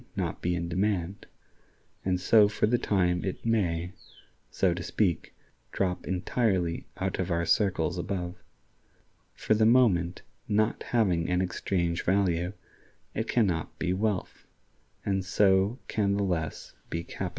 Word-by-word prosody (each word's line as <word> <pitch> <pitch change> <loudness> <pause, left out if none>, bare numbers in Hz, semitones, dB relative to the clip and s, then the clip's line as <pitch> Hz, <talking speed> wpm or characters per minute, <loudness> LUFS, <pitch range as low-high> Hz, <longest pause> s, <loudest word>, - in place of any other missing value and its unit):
not - - -3
be 90 0 0
in 85 0 -2
demand), 95 +1 -1 0.8
and 90 -1 0
so 105 +2 +6
for 105 - 0
the 120 +3 +2
time 90 -5 +1
it 95 +3 -4
may, 90 -6 0 0.6
so 90 -3 +1
to 90 - -5
speak, 90 0 -1 0.4
drop 90 -2 -2
entirely 95 -2 0
out 95 0 -2
of 95 - -1
our 85 -1 0
circles 90 -2 +1
above. 90 0 -4 0.9
For - - +1
the 110 0 +4
moment, 100 -8 +3 0.2
not 110 +2 +1
having 90 -9 +1
an 90 0 +2
exchange 90 -2 -1
value, 90 -1 +1 0.6
it 110 +1 -2
can 120 -3 +3
not 80 -4 -2
be 90 - 0
wealth, 100 -1 -2 0.6
and 95 -1 0
so 95 +3 +3
can 100 -2 +1
the 100 - 0
less 85 -5 -3 0.2
be 85 0 -3
capital. - - -5
95 Hz, 140 wpm, -28 LUFS, 85-105 Hz, 0.9 s, so